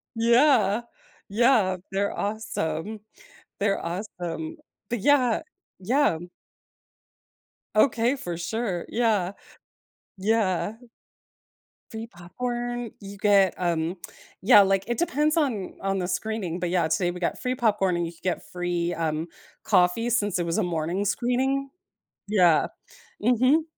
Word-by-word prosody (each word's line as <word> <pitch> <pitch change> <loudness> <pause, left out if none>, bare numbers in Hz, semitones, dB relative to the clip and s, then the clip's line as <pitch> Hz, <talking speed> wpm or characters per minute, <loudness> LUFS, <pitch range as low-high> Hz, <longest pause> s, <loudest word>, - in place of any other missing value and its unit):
Yeah. 235 -2 +4 0.5
Yeah, 220 -5 +3
they're 200 +1 -1
awesome 205 -2 -3 0.6
they're 200 0 0
awesome. 190 - -5 0.3
But 240 -2 -1
yeah, 255 -3 +3 0.4
yeah 250 - +2
m 175 +2 -9 1.5
Okay, 235 +2 +3
for 175 -10 -5
sure, 185 0 -3
yeah. 210 -6 +1 0.8
Yeah. 205 -1 +1 1.2
Free 225 0 -5
popcorn, 240 +5 -4
you 200 0 -9
get, 200 -3 +4
um 170 0 -1 0.5
yeah, 210 -1 +8
like, 195 0 +2
it 240 - -1
depends 305 -1 +1
on 240 - 0
on 195 0 0
the 180 -1 -2
screening, 180 -2 -3
but 175 -1 -1
yeah, 175 -3 +2
today 175 +3 +1
we 180 0 -5
got 170 - -2
free 255 0 -1
popcorn 205 -6 +2
and 170 0 0
you 165 - -5
could 165 - -22
get 180 -2 -2
free, 175 -1 -1
um, 160 0 -2 0.4
coffee 195 +4 +3
since 205 -5 +1
it 175 - -1
was 170 +6 0
a - - +2
morning 175 +2 -1
screening. 260 +5 0 0.6
Yeah. 180 -6 +4 0.6
Mhm. 255 +6 +4
200 Hz, 125 wpm, -26 LUFS, 175-240 Hz, 1.5 s, yeah